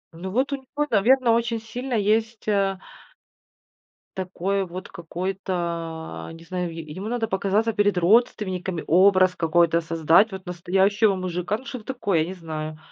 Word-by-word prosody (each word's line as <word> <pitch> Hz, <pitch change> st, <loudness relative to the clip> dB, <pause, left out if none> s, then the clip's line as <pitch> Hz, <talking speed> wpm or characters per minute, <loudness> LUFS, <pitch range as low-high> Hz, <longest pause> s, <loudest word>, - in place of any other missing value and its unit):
Ну, 180 Hz, +3 st, -6 dB
вот 260 Hz, +8 st, 0 dB
у -, -, 0 dB
него, 280 Hz, +3 st, -3 dB
наверно, 245 Hz, +4 st, +4 dB
очень 230 Hz, 0 st, +1 dB
сильно 245 Hz, +3 st, -5 dB
есть, 220 Hz, +2 st, 0 dB
а 195 Hz, -2 st, +1 dB, 1.4 s
Такой 190 Hz, +1 st, -1 dB
вот 180 Hz, +2 st, -8 dB
какой-то, 170 Hz, -2 st, -4 dB
не 165 Hz, -, -12 dB
знаю, 180 Hz, 0 st, -3 dB
е 165 Hz, 0 st, -7 dB
ему 170 Hz, +7 st, -7 dB
надо 230 Hz, -1 st, -1 dB
показаться 200 Hz, +3 st, 0 dB
перед 205 Hz, -3 st, +2 dB
родственниками, 185 Hz, -3 st, +1 dB
образ 185 Hz, +1 st, +5 dB
какой-то 170 Hz, 0 st, +2 dB
создать. 165 Hz, +5 st, +3 dB
Вот 190 Hz, 0 st, -8 dB
настоящего 190 Hz, +4 st, +2 dB
мужика, 185 Hz, +2 st, -2 dB
ну 260 Hz, -, -15 dB
что 250 Hz, -5 st, -7 dB
такое, 205 Hz, -10 st, -1 dB
я 155 Hz, -, +2 dB
не 185 Hz, -, -5 dB
знаю. 155 Hz, -3 st, -6 dB
190 Hz, 150 wpm, -24 LUFS, 170-220 Hz, 1.4 s, образ